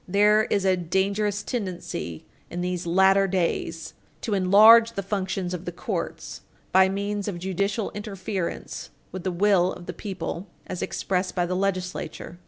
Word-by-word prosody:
There 210 +3 +4
is 200 -2 0
a 190 -1 +4
dangerous 200 +4 0
tendency 180 - -4 0.2
in 175 - -4
these 180 -1 -2
latter 190 +2 +4
days 170 -3 -2 0.3
to 220 - -2
enlarge 215 +5 +7
the 200 - -3
functions 190 -2 -2
of 180 0 -5
the 175 - -3
courts 175 - -5 0.3
by 190 0 +6
means 200 +1 -2
of 195 -4 -3
judicial 195 +4 -1
interference 195 -3 -5 0.2
with 185 -1 -6
the 185 - -1
will 185 0 +3
of 175 - -9
the - - -5
people 190 -2 -5 0.2
as 185 - -5
expressed 185 -1 -2
by 175 -1 +1
the 180 +1 -2
legislature. 185 -2 -3
190 Hz, 155 wpm, -25 LUFS, 180-200 Hz, 0.3 s, enlarge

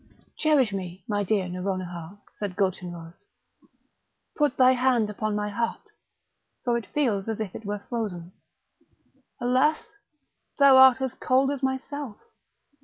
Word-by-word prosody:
"Cherish 285 -9 +2
me, 185 -1 -6
my 205 -1 0
dear 200 -1 0
Nouronihar!" 180 -1 -5 0.2
said 200 -3 -4
Gulchenrouz; 175 -4 -3 1.2
"put 295 -2 +1
thy 255 0 +6
hand 250 -4 +2
upon 215 0 -2
my 210 0 -2
heart, 230 +3 -2 0.8
for 240 -2 +1
it 235 - -3
feels 225 -10 0
as 225 - -3
if 210 -4 -4
it 220 - -9
were 205 0 -4
frozen. 190 -8 -4 1.1
Alas! 260 - +2 0.7
thou 280 -2 +7
art 265 -1 +7
as 265 -2 -2
cold 265 +2 +2
as 280 -2 -4
myself! 265 -2 -3
220 Hz, 130 wpm, -26 LUFS, 195-260 Hz, 1.2 s, thou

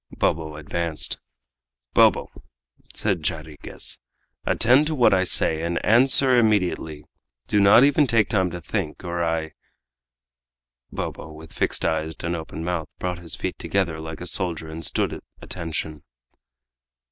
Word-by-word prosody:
Bobo 80 -1 -1
advanced. 80 +1 -2 0.7
"Bobo," - - +4 0.6
said 95 -6 -1
Jarriquez, 75 -2 -5 0.5
"attend 130 +6 +4
to 155 - -1
what 120 -7 +4
I 95 -1 +3
say, 80 -3 +2
and 85 +1 -2
answer 130 +2 +6
immediately; 90 -9 0 0.4
do 105 - +1
not 100 +5 +7
even 145 +1 +4
take 115 -3 +3
time 95 -4 +1
to 90 0 -7
think, 75 +1 -4
or 85 -1 -2
I 80 -1 -1 0.7
" - - -60
Bobo, 80 - -5
with 80 +1 -12
fixed - - -1
eyes 80 0 -1
and 85 +1 -1
open 80 0 -6
mouth, 85 -3 -3
brought 90 -1 -3
his 85 -2 -4
feet - - -5
together 90 -5 -1
like 80 +1 -7
a - - -5
soldier 85 -4 -2
and 80 +1 -7
stood - - -1
at - - -8 0.2
attention. 80 -3 -5
85 Hz, 145 wpm, -23 LUFS, 80-100 Hz, 0.7 s, not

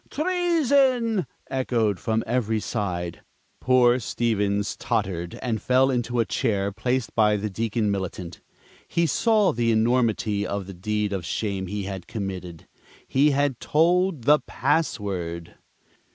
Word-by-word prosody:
Treason!" 280 - +2 0.2
echoed 115 -6 0
from 110 0 -1
every 115 -2 0
side. 90 -7 -3 0.4
Poor 125 -1 +4
Stevens 105 -3 -1
tottered, 85 -2 -2
and 115 -4 -1
fell 130 +1 +3
into 120 -1 -1
a 115 - +3
chair 100 -6 0
placed 125 +3 -2
by 105 -2 +3
the 105 +1 -3
Deacon 110 +1 -1
Militant. 95 -3 -5 0.5
He 170 - +1
saw 215 - +3
the 115 0 +1
enormity 110 -2 +1
of 100 -2 -3
the 95 - -8
deed 105 +2 -2
of 95 -3 -3
shame 95 +1 -3
he 100 +2 -4
had 95 -1 -6
committed. 95 -6 -6 0.4
He 140 +3 +3
had 140 -3 0
told 170 -1 +2
the 150 +4 +5
password! 90 - -2
110 Hz, 130 wpm, -24 LUFS, 100-130 Hz, 0.5 s, the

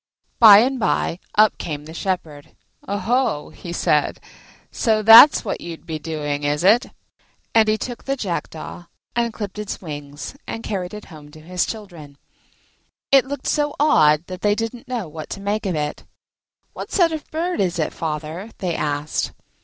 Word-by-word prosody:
By 215 -4 +10
and 260 +2 0
by 180 -5 0 0.2
up 215 0 +4
came 150 -3 -5
the 160 - -10
Shepherd. 165 -5 -4 0.3
"Oho," 205 - -1
he 175 - -9
said, 170 - +1 0.5
"so 215 -2 +1
that's 225 +6 +9
what 200 - -3
you'd 170 -1 -8
be 160 -2 -5
doing, 150 -2 -4
is 145 +2 0
it?" 225 +7 +5 0.7
And 225 -1 +5
he 215 - +2
took 240 +1 -6
the 275 - -1
Jackdaw, 175 - -5 0.3
and 235 -1 +1
clipped 210 -2 -6
its 210 -2 -5
wings 145 - -8
and 225 - -5
carried 185 -1 -4
it 210 - -9
home 150 -1 -12
to 155 - -14
his 180 +2 -2
children. 170 -10 -9 0.9
It 275 -2 +6
looked 285 -1 -6
so 295 -1 0
odd 155 - +4
that 185 0 -8
they 205 0 +2
didn't 225 +2 -5
know 240 -7 -3
what 155 0 -9
to - - -6
make 205 +1 -2
of 180 - -1
it. 150 -1 -3 0.7
"What - - -8
sort 345 -4 +3
of 315 -2 -6
bird 345 +3 -2
is 180 -3 0
it, 155 - -1
father?" 160 +5 -5
they 180 -3 -2
asked. 145 0 -2
190 Hz, 170 wpm, -21 LUFS, 155-225 Hz, 0.9 s, By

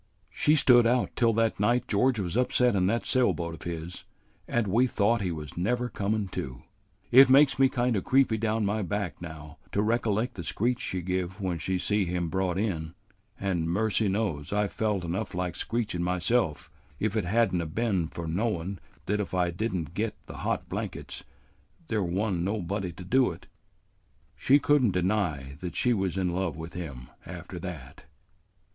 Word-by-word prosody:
"She 150 - +3
stood 120 -5 +6
out 125 +1 +1
till 115 -1 +3
that 115 -1 +1
night 120 +4 +2
George 120 +4 +2
was 90 -2 -3
upset 125 -1 +3
in 90 -1 +2
that 115 +4 0
sail 130 -1 +3
boat 85 -1 -4
of 80 - -10
his 85 +1 -6 0.4
and 120 -2 +1
we 115 +6 +3
thought 115 0 +2
he 90 -3 -1
was 75 -3 -7
never 120 +7 0
comin' 100 0 -1
to. 65 -7 -6 0.5
It 130 +2 +9
makes 135 +1 +6
me 135 -1 +6
kind 120 -2 +1
o' 100 - +1
creepy 130 -5 +3
down 110 0 0
my 105 +2 0
back 100 -5 -3
now 80 -3 -9
to 100 - +1
recollect 115 +1 0
the 90 - -6
screech 120 +8 0
she 90 -1 -3
give 95 +1 -2
when 90 -4 -2
she 95 +4 -1
see 105 +2 +1
him 90 -1 -2
brought 95 -1 0
in; 85 -6 -2 0.4
an' 90 -4 -1
mercy 110 +3 +1
knows 95 -8 -1
I 105 0 +1
felt 100 0 -1
enough 85 +2 -3
like 90 -2 -2
screechin' 105 -3 -2
myself, 90 - 0 0.3
if 110 0 -1
it 105 -5 0
had 110 +2 +2
n't 90 - +1
'a' 85 - -4
been 95 -1 0
for 85 +1 -7
knowin' 95 0 -2 0.3
that 105 +1 0
if 100 -2 -3
I 90 -1 +1
did 110 +6 -2
n't 85 -2 -4
get 110 +2 -2
the - - -9
hot - - -2
blankets, - - -5 0.7
there 110 -2 +1
wa'n't 95 0 -1
nobody 95 -1 -2
to 90 - -10
do 125 +8 +3
it. 85 - -9 0.9
She 140 - +4
could 145 -1 +3
n't 105 -6 +3
deny 85 -8 -1
that 90 -1 -6
she 125 - +3
was 95 -3 -1
in 90 -2 0
love 90 -4 -2
with 80 +1 -7
him 70 -8 -7
after - - -8
that." - - -8
100 Hz, 190 wpm, -28 LUFS, 85-115 Hz, 0.9 s, It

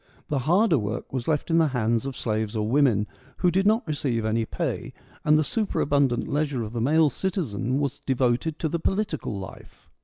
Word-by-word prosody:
The 145 - 0
harder 180 - +4
work 110 +4 -4
was 130 -3 -3
left 155 +1 0
in 165 - +4
the 160 - +4
hands 115 +2 +1
of 135 - -6
slaves 110 -1 -2
or 105 -1 0
women, 120 -5 +3 0.3
who 180 - +2
did 190 +3 +2
not 220 +2 +3
receive 135 -8 -1
any 110 +1 +1
pay, - - -3 0.3
and 150 0 +5
the 155 - +3
super 210 +8 -1
abundant 140 -4 +2
leisure 145 -4 -1
of 110 +1 -7
the 115 - -2
male 150 +4 +4
citizen 130 - -2
was 140 -2 -2
devoted 130 +4 0
to 160 - -1
the 170 +2 -2
political 180 - -2
life. 95 -2 -11
140 Hz, 195 wpm, -25 LUFS, 115-160 Hz, 0.3 s, and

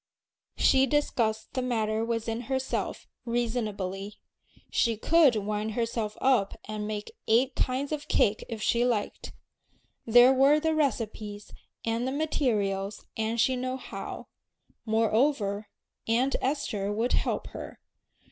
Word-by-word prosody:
She 265 0 +4
discussed 230 -6 0
the 260 - -1
matter 220 -3 0
within 230 0 -2
herself, 265 0 -2 0.2
reasonably. 210 -5 -2 0.6
She 230 -2 +2
could 305 +1 +5
wind 210 +1 -2
herself 230 -2 -2
up 250 -7 +2
and 210 -1 -4
make 210 -1 -4 0.2
eight 255 +4 +3
kinds 265 +3 -1
of 300 -1 -3
cake 210 +1 +2
if 225 -2 -5
she 235 0 +2
liked. 235 -4 -1 0.8
There 245 +3 +7
were 275 +3 +5
the 320 +1 +1
recipes 220 -8 -2 0.3
and 230 +2 0
the - - -1
materials 210 -10 -1
and 225 +1 -1
she 260 +3 +3
knew 255 +1 -2
how; - - -7 0.6
moreover, 220 -1 +1 0.4
Aunt 245 +4 +2
Esther 235 -8 -1
would 225 +4 0
help - - -1
her. - - -9
230 Hz, 125 wpm, -28 LUFS, 215-260 Hz, 0.8 s, There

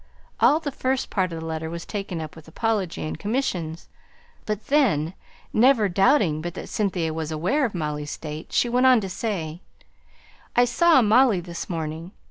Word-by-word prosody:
All 295 +5 +5
the 295 -3 -4
first 260 -1 -1
part 185 -3 0
of 165 - -5
the 160 - -7
letter 160 0 -4
was 170 0 -6
taken 195 -5 -4
up 155 -1 -7
with 160 -1 -14
apology 200 0 -1
and 155 - -5
commissions; 180 -8 -2 0.6
but 215 0 -3
then, 200 - +2 0.4
never 235 -2 +5
doubting 190 - +3
but 175 +1 -5
that - - -7
Cynthia 180 -6 -1
was 160 -1 -4
aware 185 - +1
of 220 - -4
Molly's 150 -2 -3
state, 155 +1 -7
she - - +2
went 250 +2 +3
on 255 -2 +6
to 195 - -4
say 180 -5 -4 0.9
"I 245 - +5
saw 315 +2 +4
Molly 225 -1 +4
this 170 -1 -7
morning. 165 +2 -4
185 Hz, 175 wpm, -24 LUFS, 160-240 Hz, 0.9 s, on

